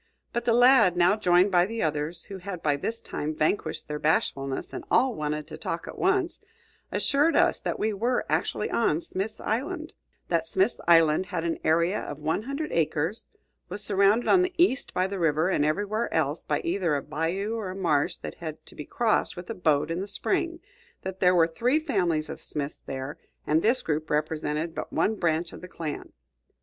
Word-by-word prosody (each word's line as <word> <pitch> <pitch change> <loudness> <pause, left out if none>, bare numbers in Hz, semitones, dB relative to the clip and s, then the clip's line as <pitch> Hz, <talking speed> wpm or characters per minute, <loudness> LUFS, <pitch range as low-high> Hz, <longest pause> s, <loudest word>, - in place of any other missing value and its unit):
But 235 0 -2
the 235 - +3
lad, 240 -7 +6
now 175 +3 +5
joined 180 -1 +3
by 175 0 +4
the 230 +1 -3
others, 155 +2 -1
who 195 -1 -8
had 180 -2 -7
by 150 -2 +2
this 225 +11 -3
time 155 +1 -4
vanquished 155 +7 -1
their 150 0 -4
bashfulness 135 -3 0
and - - -5
all 255 +1 +3
wanted 150 -3 -3
to - - -10
talk 165 - -4
at - - -8
once, 375 -2 +1 0.5
assured 295 +4 +2
us - - +3
that - - -3
we 215 0 0
were 240 +5 0
actually - - -1
on 165 -9 +2
Smith's 200 +5 -4
Island; 315 - -3 0.3
that 170 -2 +1
Smith's 190 +7 0
Island 165 +1 +5
had 175 -2 -3
an 170 -1 -2
area 170 +5 +2
of 145 - -6
one 160 +6 0
hundred 280 +6 -4
acres, 165 +5 -1 0.4
was 205 - -5
surrounded 200 +3 +3
on 370 - +6
the 365 0 -1
east 335 -6 +2
by 185 - +1
the 195 0 -4
river, 160 +1 +2
and 165 - +2
everywhere 205 +9 0
else 155 -1 0
by 150 - 0
either 170 -3 0
a 140 - -2
bayou 170 +8 -2
or 220 -4 -3
a 185 - -6
marsh 160 -7 +1
that - - -7
had 160 -2 -7
to - - -12
be 150 - -8
crossed 225 -6 0
with 175 +4 -6
a - - -2
boat 155 -5 +1
in 170 - -2
the 195 - -4
spring; 335 - -1 0.4
that 190 0 -5
there 180 -1 +4
were 165 -2 +6
three 235 - +1
families 175 - 0
of - - -7
Smiths 145 -1 -5
there, 135 +2 -5 0.3
and 155 +2 +2
this 235 +6 +2
group 155 0 -2
represented 155 +1 -1
but - - -5
one 220 - +1
branch 165 -3 0
of - - -10
the 180 - -8
clan. 160 -4 -6
180 Hz, 200 wpm, -27 LUFS, 155-220 Hz, 0.5 s, lad